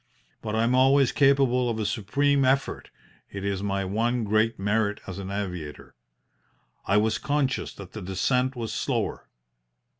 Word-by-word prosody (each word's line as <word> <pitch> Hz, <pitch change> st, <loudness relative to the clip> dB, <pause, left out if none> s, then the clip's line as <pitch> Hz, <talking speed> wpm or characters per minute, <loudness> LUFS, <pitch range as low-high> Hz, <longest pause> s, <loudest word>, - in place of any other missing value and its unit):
But 110 Hz, 0 st, -3 dB
I 110 Hz, -, +2 dB
am 120 Hz, +2 st, +2 dB
always 135 Hz, +1 st, +4 dB
capable 135 Hz, -3 st, +3 dB
of 115 Hz, -, -2 dB
a 110 Hz, -, -2 dB
supreme 140 Hz, +7 st, +1 dB
effort 135 Hz, +1 st, 0 dB, 0.4 s
it 100 Hz, 0 st, -6 dB
is 100 Hz, -1 st, -1 dB
my 100 Hz, -1 st, -1 dB
one 115 Hz, +5 st, 0 dB
great 110 Hz, +2 st, +1 dB
merit 105 Hz, +1 st, 0 dB
as 95 Hz, 0 st, -7 dB
an 95 Hz, -1 st, -6 dB
aviator. 90 Hz, -7 st, -5 dB, 0.9 s
I 100 Hz, -, +3 dB
was 110 Hz, +1 st, +1 dB
conscious 145 Hz, -2 st, -1 dB
that 100 Hz, -3 st, -10 dB
the 110 Hz, -, -7 dB
descent 125 Hz, +8 st, 0 dB
was 115 Hz, -2 st, -4 dB
slower. -, -, -2 dB
110 Hz, 155 wpm, -26 LUFS, 100-130 Hz, 0.9 s, always